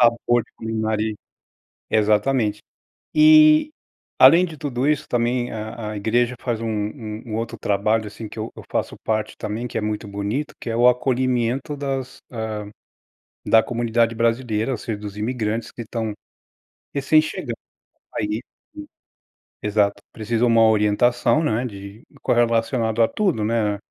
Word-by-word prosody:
Sabor 120 0 +3
de - - -32
comer 110 -1 -3
ali. 110 0 -1 0.8
Exatamente. 110 +1 +2 0.6
E 310 0 +7 0.5
além 165 +8 +8
de 160 -3 -9
tudo 135 -1 -2
isso 150 -1 +1
também 120 +1 0
a 110 0 -5
a 105 - -5
igreja 120 +4 +1
faz 115 -3 -2
um 115 - -2 0.6
um 110 -2 -5
outro 115 0 -4
trabalho, 105 +2 +1
assim 110 +1 -8
que - - -12
eu 110 - -4
eu - - -10
faço - - -2
parte 110 -1 -2
também, 110 +3 -4
que 115 - -5
é - - -1
muito 105 0 -3
bonito, 100 +9 -3
que - - -6
é 115 - -1
o 120 +1 +6
acolhimento 125 +2 +1
das 135 -2 -4
hã, 110 -2 -4 1.0
da 110 0 +6
comunidade 115 -1 0
brasileira 115 0 0
ou 120 - -1
seja 110 -1 -4
dos 105 -1 -8
imigrantes 110 0 -2
que 120 - -8
estão 110 -1 -3 0.8
recém 145 +3 +4
chegando, 120 -6 -5 0.6
aí 105 +2 -1 1.3
Exato, 105 -1 +1
precisa 115 +2 0
uma 115 -1 +5
orientação, 110 +7 +3
né, 120 -2 0
de 100 0 -9 0.2
correlacionado 115 -1 +1
a 115 - +5
tudo, 180 - 0
né, 105 -2 0
115 Hz, 145 wpm, -22 LUFS, 110-125 Hz, 1.3 s, além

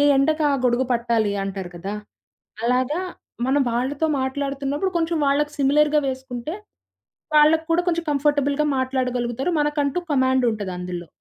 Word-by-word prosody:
ఎండకు 305 +3 +2
ఆ - - +2
గొడుగు 250 +1 +2
పట్టాలి 235 -3 +1
అంటారు 195 -2 -5
కదా! 190 +4 -5 0.7
అలాగా 255 +7 +1 0.4
మనం 275 +2 +2
వాళ్ళతో 265 +6 -1 0.2
మాట్లాడుతున్నప్పుడు 280 +5 -2
కొంచెం 330 0 0
వాళ్ళకి 290 +2 +1
సిమిలర్‌గ 295 +2 +3
వేసుకుంటే 260 +2 -5 0.8
వాళ్ళకి 310 +2 +5
కూడా 340 - +3
కొంచెం 340 -1 +1
కంఫర్టబుల్‌గా 285 0 +1
మాట్లాడగలుగుతారు. 255 +1 -1
మనకంటూ 295 +1 0
కమాండ్ 260 -1 +2
ఉంటది 205 -4 -4
అందులో. 180 -1 -6
270 Hz, 125 wpm, -22 LUFS, 240-295 Hz, 0.8 s, వాళ్ళకి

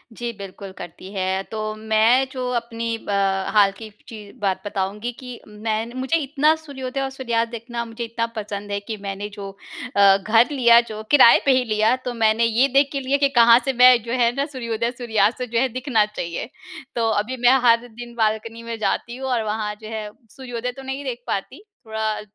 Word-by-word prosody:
जी 240 +1 -4
बिल्कुल 195 0 -9
करती 175 +2 -10
है। 190 0 -1
तो 220 - -4 0.2
मैं 220 +4 +3
जो 255 -1 -4
अपनी 230 -1 -3
ब, 225 - -13 0.4
हाल 200 -2 +5
की 220 -1 -9 0.2
चीज़ 210 -3 -11
बात 195 -2 0
बताऊँगी 205 +3 -3
कि 250 -2 -9
मैं 215 +2 -3
मुझे 260 +5 0
इतना 300 +1 +2
सूर्योदय 275 -4 -6
और 270 - -2
सूर्यास्त 235 -3 -2
देखना 235 0 -5
मुझे 230 +1 -6
इतना 230 0 -2
पसंद 205 -1 -5
है 200 - -1
कि 215 +2 -6
मैंने 195 +1 -4
जो 200 -1 -8 0.5
अ, 200 -1 +6
घर 225 +6 +3
लिया 235 -4 +6
जो 215 0 -6
किराए 265 -5 +8
पे 275 - +5
ही 255 - +2
लिया 220 +1 +2
तो 245 - -2
मैंने 225 0 +2
ये 235 +4 +3
देख 275 0 +4
के 275 - -2
लिया 270 +1 0
कि 280 -1 +2
कहाँ 235 +1 +8
से 270 - 0
मैं 250 +1 +7
जो 230 - -6
है 235 0 +4
ना 280 +1 0
सूर्योदय-सूर्यास्त 235 -3 -1
जो 235 -1 -1
है 265 - +2
दिखना 245 -3 +1
चाहिए। 210 0 -5 0.5
तो 230 -1 +1
अभी 220 +4 -1
मैं 245 +2 +5
हर 230 +1 +4
दिन 240 +1 -11
बाल्कनी 225 +1 -1
में 230 -1 -5
जाती 235 +2 -2
हूँ 265 0 -4
और 240 -3 0
वहाँ 210 0 -2
जो 215 - -9
है 215 -1 -5 0.2
सूर्योदय 245 +1 -5
तो 270 +2 -11
नहीं 265 +1 -5
देख 250 -3 -5
पाती, 200 - -4 0.2
थोड़ा 220 -1 -2
230 Hz, 200 wpm, -22 LUFS, 215-250 Hz, 0.5 s, किराए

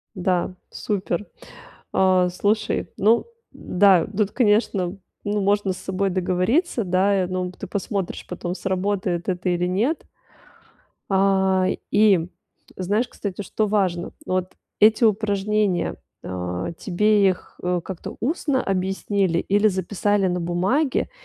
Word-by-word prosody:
Да, 185 -1 0 0.2
супер. 200 -2 -2 0.7
А, 185 -1 +3
слушай, 210 +4 0
ну 225 +4 +3 0.3
да, 185 -2 +3
тут, 205 -1 +1
конечно, 210 -5 +1 0.3
ну, 205 0 -1
можно 200 -1 +1
с - - -10
собой 195 +1 -1
договориться, 190 - +1
да 190 +1 +2
и, - - -2
ну, 180 0 -3
ты 190 +2 -9
посмотришь 195 0 -3
потом, 180 0 -4
сработает 190 -2 -1
это 180 0 -1
или 175 0 +1
нет. 225 - 0 1.0
А, 190 -1 +3 0.3
и 195 -6 +4 0.5
знаешь, 205 +6 0
кстати, 200 -1 -5
что 215 +2 -1
важно? 185 -4 0
Ну, - - -2
вот 185 0 -2 0.3
эти 220 +2 +6
упражнения, 205 -3 +1 0.3
а, 90 - -4
тебе 205 +1 +3
их, 185 - -5
э, 180 0 +1
как-то 185 -2 -7
устно 275 - 0
объяснили 190 -1 0
или 205 +4 +2
записали 195 +1 0
на 180 0 -1
бумаге, 190 - 0
190 Hz, 125 wpm, -23 LUFS, 180-205 Hz, 1.0 s, эти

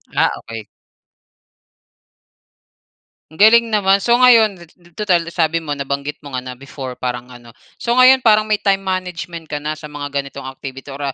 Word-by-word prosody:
Ah, - - +3
okey. 115 -2 -8 2.7
Ang 160 - -15
galing 230 +3 +6
naman, 200 -2 +2
so 235 +3 +3
ngayon 230 -5 +5
tu 170 +1 -24
tutal 190 -5 +2
sabi 165 -1 0
mo 145 -3 -4
nabanggit 140 +1 -4
mo 140 - -10
nga 130 - -2
na 125 0 -9
before 135 -1 -8
parang 125 0 -4
ano. 120 -2 -14 0.2
So 235 - -1
ngayon 255 +1 +5
parang 215 -1 +4
may 215 - +2
time 195 -1 +1
management 180 -3 -5
ka 150 -1 -5
na 155 +1 -4
sa 155 - -11
mga 145 -1 -7
ganitong 140 -1 -5
activity 135 +1 -9
or, 140 0 -4
155 Hz, 165 wpm, -18 LUFS, 140-200 Hz, 2.7 s, galing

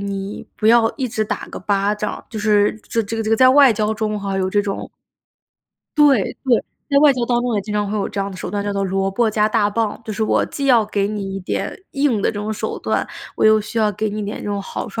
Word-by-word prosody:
你 200 0 -5
不 215 - +1
要 230 -1 +5
一 260 -3 -2
直 215 0 -1
打 - - -4
个 - - -7
巴 200 0 0
掌， 210 0 -4
就 220 - -5
是 210 -1 +3 0.2
这 230 - 0
这 220 +2 -5
个 225 - -1
这 - - -2
个 225 - +5
在 255 +1 +6
外 275 -2 +7
交 215 0 0
中 215 -1 -2
哈， 195 -1 -2
有 185 0 0
这 205 +1 +1
种 200 -1 -4 1.1
对， 280 -8 +5 0.2
对， 245 -4 +2 0.2
在 280 -1 +4
外 290 -1 +6
交 245 -2 -1
当 240 0 +1
中 245 -2 -1
也 205 - +1
经 210 +1 -6
常 205 -1 0
会 215 - -1
有 200 - -1
这 200 - -4
样 195 - -2
的 190 - -9
手 - - -5
段， 205 +1 -2
叫 205 - -1
做 200 0 -1
“萝 195 +1 0
卜 225 +2 +1
加 215 0 +2
大 215 -2 +2
棒”。 220 0 -2
就 220 - -5
是 220 +2 -2
我 - - +2
既 280 - -4
要 240 -5 +5
给 205 -1 -1
你 200 -2 -4
一 - - -5
点 180 - -3 0.2
硬 275 -8 +1
的 - - +2
这 - - -12
种 215 +1 -3
手 210 - -4
段， - - -1 0.3
我 - - +1
又 215 0 +6
需 220 +2 -4
要 215 -1 +3
给 215 +2 -2
你 210 +1 -4
一 - - -3
点 205 - -5
这 - - -8
种 205 -1 -2
好 - - -5
处。 - - -5
215 Hz, 300 characters per minute, -20 LUFS, 200-230 Hz, 1.1 s, 外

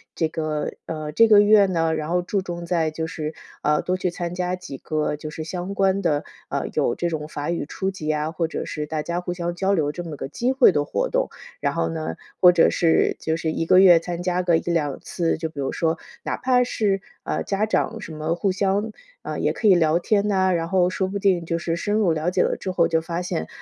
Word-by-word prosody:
这 160 - +1
个 155 -2 -3
呃， 155 -1 -4
这 230 +8 +5
个 210 -2 +7
月 205 -1 +6
呢， 165 -3 +1
然 155 0 -4
后 180 +1 +1
注 195 +2 -1
重 175 -2 -6
在 170 -2 +1
就 160 +1 -3
是， 155 -1 -5 0.3
呃， 150 0 +2
多 180 - 0
去 185 0 -1
参 175 0 -4
加 180 0 -1
几 180 -7 -8
个 155 +2 -2
就 150 +1 -7
是 155 +1 -6
相 180 +4 -5
关 195 0 +2
的， 150 -5 +1 0.3
呃， - - -2
有 120 - +1
这 175 - -1
种 155 -2 -4
法 150 +1 -4
语 170 - -2
初 190 +4 -2
级 155 -5 -3
啊， 150 +1 -2
或 165 0 -1
者 - - -4
是 150 - -4
大 155 -1 -3
家 170 +2 -2
互 175 - -4
相 175 -1 -3
交 195 +2 +1
流 150 -4 +1
这 175 +3 -6
么 160 -3 -6
个 140 - -5
机 240 - -1
会 260 -5 +6
的 145 -4 +1
活 - - -1
动。 - - 0 0.3
然 - - 0
后 85 - +1
呢， 80 0 -4 0.3
或 180 - +9
者 175 -2 +4
是 165 -2 +2
就 160 0 -1
是 160 -1 -2
1 165 +1 -2
个 185 - +6
月 180 -3 +8
参 175 +1 -5
加 180 0 0
个 175 -2 +3
1-2 165 -4 -1
次， 170 -2 -1
就 160 - -3
比 150 - -10
如 135 - -1
说 165 0 0 0.3
哪 - - -2
怕 250 -1 +3
是， 205 -5 0 0.2
啊， - - -2
家 200 +2 0
长 220 +1 -1
什 165 - -8
么 155 +2 -1
互 190 +3 0
相 200 +3 0 0.3
呃， - - -5
也 - - +1
可 220 - 0
以 195 - +7
聊 165 0 +3
天 205 +2 +1
呐， 190 -2 +2
然 165 -1 -1
后 180 -1 +3
说 190 +1 -1
不 200 +1 -3
定 185 -4 +2
就 165 0 -1
是 165 0 -2
深 205 +4 -1
入 210 -6 +3
了 160 +2 -1
解 180 - +2
了 - - +1
之 190 - -3
后 170 -2 +3
就 160 -1 +1
发 170 +1 -3
现， 80 - -3
170 Hz, 265 characters per minute, -23 LUFS, 160-190 Hz, 0.3 s, 或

